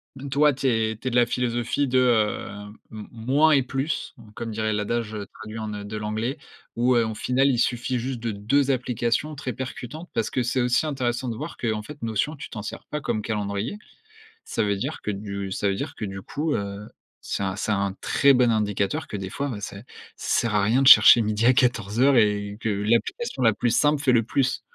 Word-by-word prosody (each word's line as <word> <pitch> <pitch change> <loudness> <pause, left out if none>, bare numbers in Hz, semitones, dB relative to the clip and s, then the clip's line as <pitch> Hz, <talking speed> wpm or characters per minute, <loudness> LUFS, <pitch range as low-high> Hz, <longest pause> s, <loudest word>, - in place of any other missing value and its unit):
donc 140 +1 -8
toi 145 +1 +4
tu 135 +1 -2
es 110 -2 +1
tu 130 - -6
es - - 0
de - - -3
la 120 -1 +5
philosophie 120 +3 -1
de, 130 0 +2
hem, 105 -3 0 0.2
m 110 -2 -8
moins 135 +7 +2
et 140 -3 +5
plus, 135 +6 -3
hein, 115 - -14
comme 115 +1 -5
dirait 110 0 -1
l'adage, 110 +1 -2
heu, 105 -2 -5
traduit 110 0 -8
en, 110 -1 -4
heu, 100 0 -6
de 110 - -6
l'anglais, 110 +7 -3 0.4
où, 125 +2 +3
heu, 115 -1 +3
au 110 - -3
final 125 +5 +1
il 130 -4 +2
suffit 120 +1 0
juste 125 +1 -4
de 115 -1 -2
2 130 +8 +1
applications 125 +3 -1
très 130 -2 -4
percutantes. 130 +5 -7
Parce 115 -1 -1
que 130 - 0
c'est 125 +2 0
aussi 125 +5 +2
intéressant 130 -3 -2
de 115 - -3
voir 150 +7 -7
qu'en 110 -2 -2
fait 145 +6 -11
Notion, 115 +7 -1
tu - - -9
t'en 105 -3 -7
sers - - -7
pas 150 - -3
comme 110 - -1
calendrier. 105 - -3 0.7
Ça - - -1
veut 100 -1 +1
dire 95 - -4
que 105 - -2
du 100 -1 -5
ça 100 - 0
veut 100 - 0
dire - - -5
que - - -6
du 95 -1 -5
coup, 150 +10 -3
heu, 100 +1 -5 0.3
c'est 100 - -3
un 95 -1 -2
c'est 105 - -3
un 100 -2 0
très 140 0 +4
bon 125 -2 +4
indicateur 105 +6 0
que - - -5
des 95 -1 -5
fois, 140 +5 -3
heu, 105 - -7
c'est 100 +1 -7 0.3
ça - - 0
sert 115 -2 -1
à 100 - +3
rien 120 +6 +3
de 135 - +6
chercher 120 - +9
midi 105 +1 0
à 125 - +7
quatorze 115 -4 +1
heures 135 +1 +5
et 105 -2 +2
que 110 - -1
l'application 115 - -1
la 115 - +6
plus 120 - 0
simple 145 +3 +2
fait 140 - +3
le 120 -2 +4
plus. 130 +3 0
115 Hz, 235 wpm, -24 LUFS, 105-130 Hz, 0.7 s, chercher